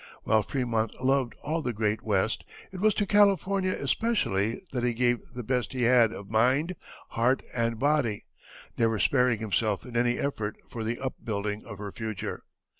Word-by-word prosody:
While 110 -1 +3
Frémont 115 -4 -1
loved 130 -1 +1
all 160 +3 -1
the 125 -5 -2
great 105 0 0
West, 105 0 0 0.3
it 185 - -7
was 215 +1 +3
to 205 - +1
California 195 -2 +3
especially 125 - 0
that 125 -2 -2
he 120 -1 +1
gave 120 +1 0
the 125 - -4
best 125 +2 -1
he 125 -2 -1
had 120 -2 +5
of 100 -3 -8
mind, 130 - +2 0.3
heart, 125 +3 +1
and 115 -1 0
body, 135 -5 +1 0.5
never 115 -1 +3
sparing 125 +2 +3
himself 110 -1 -1
in 125 - -10
any 120 +1 +2
effort 110 -7 -2
for 115 - -5
the 115 +2 -2
upbuilding 105 -5 -3
of 100 -3 -8
her 100 0 -6
future. 110 -2 -5
120 Hz, 170 wpm, -28 LUFS, 110-135 Hz, 0.5 s, had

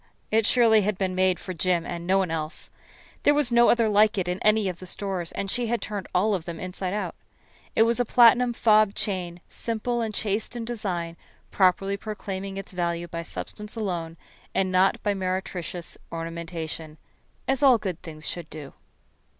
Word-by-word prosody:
It 220 -1 +3
surely 230 -3 +5
had 205 -1 -1
been 190 -1 -1
made 185 -1 +2
for 185 - -6
Jim 175 0 +1
and 170 0 -5
no 190 +1 +4
one 190 -3 +1
else. 155 -1 -3 0.5
There 290 - +4
was 290 -4 +3
no 235 0 +6
other 230 -2 +4
like 210 0 +4
it 185 -2 0
in 180 +1 -2
any 215 -1 +3
of 180 -2 -4
the 185 - -9
stores, 185 -3 -2
and 195 -1 -3
she 245 -1 0
had 235 +1 0
turned 205 -3 -5
all 205 +4 +2
of 180 -4 -2
them 170 -2 -6
inside 185 +1 -4
out. 210 - -2 0.6
It 225 - +6
was 235 +1 +2
a - - +4
platinum 240 +1 +5
fob 215 -3 +4
chain, 180 -3 -3
simple 235 +1 -2
and 225 -1 -1
chaste 215 +2 -2
in 235 -1 -4
design, 180 -8 -3 0.3
properly 195 +1 +2
proclaiming 195 -2 -5
its 195 - -6
value 175 -1 -2
by 170 0 -5
substance 210 +5 -6
alone 175 -6 -3 0.4
and 190 -1 +1
not 185 +1 +3
by 205 - +2
meretricious 185 -2 -4
ornamentation 165 -1 -5 0.5
as 270 0 +1
all 265 -4 +7
good 185 -6 -4
things 155 -2 -8
should 170 -3 -5
do. 145 -3 -9
190 Hz, 185 wpm, -26 LUFS, 175-220 Hz, 0.6 s, all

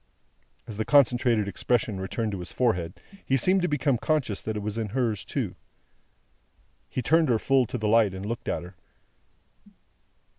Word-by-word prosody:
As 110 -4 -8
the 110 - 0
concentrated 120 -4 +3
expression 105 +1 0
returned 105 +3 -2
to 100 - -4
his 90 - -7
forehead, 90 -9 0 0.2
he 135 - +1
seemed 185 +9 +3
to 180 - +1
become 140 -4 +1
conscious 135 -10 0
that 110 -1 -3
it - - -3
was 105 0 -4
in 110 -2 -2
hers 115 -3 -1
too. - - -3 1.3
He 125 - -3
turned 160 +3 +3
her 115 - +4
full 130 +1 +2
to 125 - -4
the 110 -2 -2
light, 105 -3 +4
and 95 +1 -6
looked 115 +2 -4
at - - -2
her. 90 +1 -12
115 Hz, 175 wpm, -26 LUFS, 105-130 Hz, 1.3 s, her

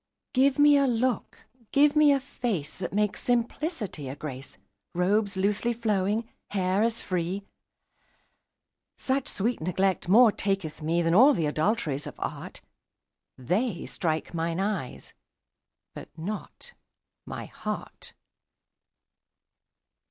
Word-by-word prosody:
Give 270 +2 +3
me 290 0 +6
a 280 -1 +3
look, 245 -1 -1 0.3
give 290 +1 +4
me 300 -1 +6
a 280 - +3
face 230 - -3
That 180 -2 -5
makes 210 0 0
simplicity 240 - -2
a 135 - -5
grace; 135 -2 -7 0.4
Robes 200 +3 +1
loosely 210 +5 +1
flowing, 215 -1 0 0.2
hair 190 0 +1
as 230 +1 0
free: 185 +2 -2 1.5
Such 265 0 -1
sweet 230 +2 -1
neglect 185 +1 0
more 225 +3 +7
taketh 195 -7 -2
me 160 +2 0
10 - - -3
Than 165 - +2
all 260 +9 +7
th' 160 - 0
adulteries 155 -2 0
of - - -8
art; - - -6 0.8
They 180 - -1
strike 160 0 -2
mine 165 +1 -1
eyes, 195 -9 -3 0.8
but - - -9
not 210 - -6 0.5
my - - -6
heart. - - -7
200 Hz, 120 wpm, -27 LUFS, 170-240 Hz, 1.5 s, more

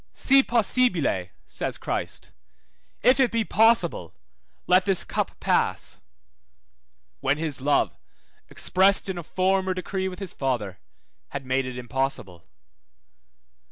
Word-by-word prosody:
Si 275 0 +4
possibile, 220 - +1 0.2
says - - -4
Christ, - - -5 0.7
if 255 +3 +5
it 260 -2 +4
be 230 -1 0
possible, 230 - +2 0.5
let 185 +1 +4
this 195 -3 +2
cup - - -3
pass, - - 0 1.2
when 135 +2 +1
his 150 -4 -3
love, 145 +2 +1 0.5
expressed 195 +1 +2
in 185 -2 -3
a - - -7
former 190 +2 0
decree 190 +1 -3
with 185 -1 -6
his 195 -3 -5
Father, 115 -8 -2 0.5
had 140 -1 -6
made 130 0 0
it 125 -1 -6
impossible. 120 - -4
180 Hz, 120 wpm, -25 LUFS, 135-200 Hz, 1.2 s, if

